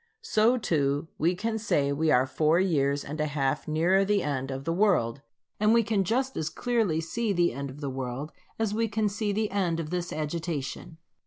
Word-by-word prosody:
So 235 Hz, -, +3 dB
too 145 Hz, -, 0 dB
we 170 Hz, +4 st, +2 dB
can 220 Hz, +4 st, -2 dB
say 145 Hz, -10 st, +1 dB
we 155 Hz, +3 st, +1 dB
are 130 Hz, -3 st, +4 dB
four 155 Hz, +5 st, +2 dB
years 145 Hz, -6 st, +1 dB
and 150 Hz, +2 st, -4 dB
a 155 Hz, -, +1 dB
half 140 Hz, -1 st, -1 dB
nearer 170 Hz, +5 st, +3 dB
the 200 Hz, -1 st, +1 dB
end 135 Hz, -2 st, -2 dB
of 135 Hz, 0 st, -4 dB
the 165 Hz, -, -1 dB
world; 170 Hz, -, +2 dB, 0.4 s
and 215 Hz, +2 st, +4 dB
we 230 Hz, -, +4 dB
can 205 Hz, -2 st, +1 dB
just 260 Hz, +7 st, 0 dB
as 160 Hz, -1 st, -2 dB
clearly 220 Hz, -5 st, 0 dB
see 205 Hz, +7 st, -1 dB
the 175 Hz, -5 st, +2 dB
end 140 Hz, +2 st, -5 dB
of 140 Hz, +3 st, -10 dB
the 140 Hz, -, -3 dB
world 130 Hz, +3 st, -4 dB, 0.3 s
as 220 Hz, -2 st, 0 dB
we 225 Hz, +1 st, +1 dB
can 215 Hz, 0 st, 0 dB
see 205 Hz, +1 st, -1 dB
the 215 Hz, +1 st, -1 dB
end 180 Hz, -5 st, 0 dB
of 160 Hz, -1 st, -5 dB
this 175 Hz, -1 st, -2 dB
agitation. 155 Hz, -1 st, -4 dB
165 Hz, 210 wpm, -27 LUFS, 145-210 Hz, 0.4 s, are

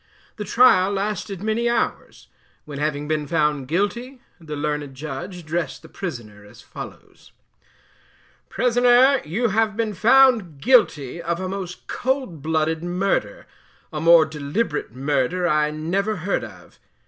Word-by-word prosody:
The 210 Hz, -, -5 dB
trial 200 Hz, -4 st, +5 dB
lasted 200 Hz, -1 st, -3 dB
many 225 Hz, +2 st, 0 dB
hours, 235 Hz, -, -2 dB, 0.4 s
when, 145 Hz, -2 st, -7 dB
having 150 Hz, -1 st, -2 dB
been 150 Hz, -1 st, -1 dB
found 150 Hz, -3 st, 0 dB
'GUILTY,' 235 Hz, -, -2 dB, 0.2 s
the 155 Hz, -3 st, -7 dB
learned 150 Hz, -2 st, -3 dB
Judge 155 Hz, +6 st, -6 dB
addressed 165 Hz, +1 st, -4 dB
the -, -, -13 dB
prisoner 115 Hz, -, -7 dB
as 105 Hz, -, -16 dB
follows: -, -, -12 dB, 1.2 s
"Prisoner, 250 Hz, +2 st, +4 dB
you 220 Hz, +10 st, 0 dB
have 215 Hz, +1 st, 0 dB
been 225 Hz, -2 st, -1 dB
found 225 Hz, -, +4 dB
guilty 170 Hz, -, +2 dB
of 170 Hz, +1 st, -2 dB
a 185 Hz, -, -3 dB
most 185 Hz, -2 st, -6 dB
cold 260 Hz, -, -2 dB
blooded 160 Hz, +1 st, -1 dB
murder, 180 Hz, +3 st, -1 dB, 0.5 s
a 150 Hz, -, -3 dB
more 165 Hz, -1 st, +7 dB
deliberate 150 Hz, -, -3 dB
murder 140 Hz, +7 st, 0 dB
I 150 Hz, -2 st, +2 dB
never 180 Hz, +8 st, -2 dB
heard 185 Hz, +3 st, -2 dB
of. -, -, -13 dB
175 Hz, 135 wpm, -22 LUFS, 150-215 Hz, 1.2 s, more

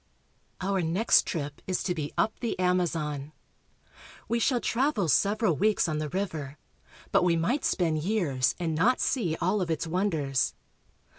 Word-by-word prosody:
OUR 190 Hz, 0 st, 0 dB
next 175 Hz, +8 st, +3 dB
trip 145 Hz, -4 st, -4 dB
is 185 Hz, -, -1 dB
to 180 Hz, -, 0 dB
be 150 Hz, -4 st, -4 dB
up 220 Hz, -, +2 dB
the 235 Hz, -, -2 dB
Amazon. 165 Hz, -5 st, -1 dB, 0.9 s
We 235 Hz, -, 0 dB
shall 245 Hz, +1 st, +2 dB
travel 235 Hz, -, 0 dB
several 200 Hz, -, +2 dB
weeks 210 Hz, +2 st, +2 dB
on 155 Hz, -1 st, -1 dB
the 155 Hz, -1 st, -3 dB
river, 155 Hz, -6 st, -4 dB, 0.5 s
but -, -, +4 dB
we 175 Hz, -2 st, +3 dB
might 230 Hz, -, 0 dB
spend 165 Hz, -4 st, +1 dB
years 155 Hz, -8 st, 0 dB
and 165 Hz, -2 st, -1 dB
not 210 Hz, +11 st, +2 dB
see 175 Hz, -, 0 dB
all 190 Hz, +4 st, +1 dB
of 175 Hz, -, -2 dB
its 160 Hz, 0 st, -1 dB
wonders. 160 Hz, -7 st, 0 dB
175 Hz, 155 wpm, -28 LUFS, 155-205 Hz, 0.9 s, but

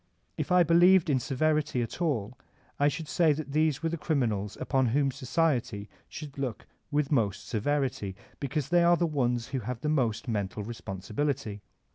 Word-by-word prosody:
If -, -, -3 dB
I 180 Hz, -1 st, +6 dB
believed 170 Hz, 0 st, +5 dB
in 130 Hz, -, +3 dB
severity 145 Hz, -1 st, 0 dB
at 115 Hz, -, -7 dB
all 125 Hz, -9 st, -1 dB, 0.4 s
I 145 Hz, -, +4 dB
should 155 Hz, +1 st, -2 dB
say 165 Hz, -2 st, +3 dB
that 145 Hz, -1 st, -5 dB
these 155 Hz, 0 st, +1 dB
were 165 Hz, -, +1 dB
the 165 Hz, 0 st, -4 dB
criminals 110 Hz, -, -1 dB
upon 130 Hz, -2 st, +1 dB
whom 135 Hz, +3 st, +2 dB
society 130 Hz, -7 st, -1 dB, 0.2 s
should 145 Hz, -2 st, -8 dB
look 130 Hz, -5 st, -3 dB, 0.2 s
with 150 Hz, -1 st, 0 dB
most 105 Hz, -6 st, 0 dB
severity, 125 Hz, -4 st, -1 dB, 0.2 s
because 140 Hz, 0 st, -2 dB
they 175 Hz, 0 st, +4 dB
are 175 Hz, 0 st, +5 dB
the 175 Hz, -, +2 dB
ones 125 Hz, -6 st, 0 dB
who 135 Hz, -1 st, -2 dB
have 120 Hz, 0 st, -5 dB
most 130 Hz, -7 st, 0 dB
mental 105 Hz, -2 st, -2 dB
responsibility. 110 Hz, +2 st, -3 dB
140 Hz, 165 wpm, -29 LUFS, 115-155 Hz, 0.4 s, I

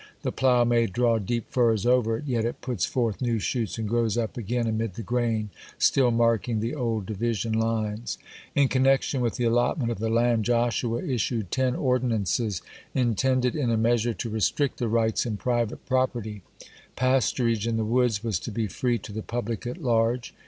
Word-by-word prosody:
The -, -, -1 dB
plough 125 Hz, -2 st, +3 dB
may 120 Hz, -1 st, +3 dB
draw 115 Hz, +3 st, +1 dB
deep 115 Hz, +3 st, -3 dB
furrows 115 Hz, -4 st, +2 dB
over 120 Hz, -2 st, +3 dB
it, 150 Hz, -, -8 dB
yet 120 Hz, -5 st, 0 dB
it 120 Hz, -, -3 dB
puts 120 Hz, -8 st, -1 dB
forth 115 Hz, -4 st, -1 dB
new 120 Hz, -2 st, +1 dB
shoots, 115 Hz, +1 st, -2 dB
and 110 Hz, -1 st, -3 dB
grows 115 Hz, -1 st, +1 dB
up 115 Hz, -2 st, -2 dB
again 120 Hz, +1 st, -2 dB
amid 110 Hz, -3 st, -2 dB
the 115 Hz, -, -5 dB
grain, 115 Hz, -3 st, -1 dB, 0.3 s
still 130 Hz, -3 st, +4 dB
marking 115 Hz, -1 st, +1 dB
the 115 Hz, +4 st, -2 dB
old 115 Hz, -7 st, -2 dB
division 110 Hz, +1 st, -2 dB
lines. 110 Hz, 0 st, -1 dB, 0.4 s
(49) 145 Hz, -, +5 dB
In -, -, +4 dB
connection 135 Hz, 0 st, +2 dB
with 120 Hz, -2 st, 0 dB
the 125 Hz, -, -2 dB
allotment 120 Hz, +2 st, +1 dB
of 115 Hz, -, -4 dB
the 110 Hz, +1 st, -1 dB
land 115 Hz, 0 st, +2 dB
Joshua 120 Hz, 0 st, 0 dB
issued 120 Hz, -, -1 dB
ten 130 Hz, -1 st, +1 dB
ordinances 115 Hz, -, 0 dB, 0.3 s
intended, 125 Hz, +1 st, +1 dB
in 140 Hz, -6 st, 0 dB
a 115 Hz, -, +2 dB
measure, 115 Hz, 0 st, +1 dB
to 115 Hz, +5 st, -4 dB
restrict 110 Hz, +6 st, 0 dB
the 120 Hz, -, 0 dB
rights 110 Hz, +1 st, +1 dB
in 110 Hz, -3 st, -2 dB
private 120 Hz, -1 st, -1 dB
property: 120 Hz, -5 st, -1 dB, 0.5 s
Pasturage 120 Hz, -3 st, +1 dB
in 115 Hz, -1 st, 0 dB
the 110 Hz, -, 0 dB
woods 115 Hz, -2 st, +1 dB
was 110 Hz, -7 st, -1 dB
to 115 Hz, -, -6 dB
be 115 Hz, +1 st, -1 dB
free 120 Hz, +4 st, -1 dB
to 105 Hz, -, -10 dB
the 110 Hz, -, -4 dB
public 115 Hz, 0 st, -4 dB
at 125 Hz, -, -4 dB
large. 120 Hz, -4 st, 0 dB
115 Hz, 190 wpm, -26 LUFS, 110-125 Hz, 0.5 s, 49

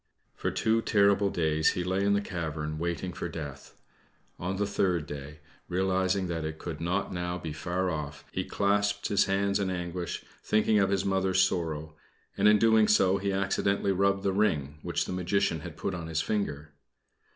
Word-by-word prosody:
For -, -, -2 dB
two 115 Hz, 0 st, +1 dB
terrible 100 Hz, -2 st, +3 dB
days 80 Hz, -3 st, +2 dB
he 90 Hz, -, -2 dB
lay 95 Hz, +2 st, 0 dB
in 100 Hz, 0 st, +3 dB
the 100 Hz, -, +2 dB
cavern 80 Hz, -5 st, -4 dB
waiting 85 Hz, +1 st, -2 dB
for 85 Hz, -, -4 dB
death. 75 Hz, -5 st, -8 dB, 0.6 s
On 90 Hz, +2 st, -2 dB
the 100 Hz, +1 st, 0 dB
third 90 Hz, -5 st, 0 dB
day, 75 Hz, +1 st, -8 dB, 0.3 s
realizing 95 Hz, +1 st, +1 dB
that 85 Hz, -2 st, -3 dB
it 80 Hz, 0 st, -4 dB
could 80 Hz, -2 st, -6 dB
not 90 Hz, +4 st, -1 dB
now 90 Hz, 0 st, -2 dB
be 80 Hz, -3 st, -5 dB
far 90 Hz, +3 st, -1 dB
off, 75 Hz, -3 st, -5 dB
he -, -, -2 dB
clasped 100 Hz, 0 st, 0 dB
his 100 Hz, -, +3 dB
hands 100 Hz, +1 st, +1 dB
in 100 Hz, -2 st, 0 dB
anguish, 90 Hz, -1 st, -4 dB, 0.2 s
thinking 110 Hz, 0 st, +3 dB
of 95 Hz, -1 st, +3 dB
his 100 Hz, 0 st, 0 dB
Mother's 95 Hz, -1 st, +3 dB
sorrow; 80 Hz, -4 st, -2 dB, 0.4 s
and -, -, +3 dB
in 105 Hz, 0 st, +6 dB, 0.3 s
so 100 Hz, -2 st, +4 dB
doing -, -, -10 dB
he 100 Hz, 0 st, 0 dB
accidently 100 Hz, 0 st, +1 dB
rubbed 100 Hz, +1 st, +2 dB
the 100 Hz, -1 st, +1 dB
ring 75 Hz, -8 st, 0 dB
which -, -, -1 dB
the -, -, -4 dB
Magician 90 Hz, -1 st, 0 dB
had -, -, -9 dB
put 95 Hz, -, -2 dB
upon 85 Hz, -2 st, -5 dB
his 80 Hz, -1 st, -1 dB
finger. 75 Hz, -8 st, -2 dB
95 Hz, 185 wpm, -29 LUFS, 80-100 Hz, 0.6 s, in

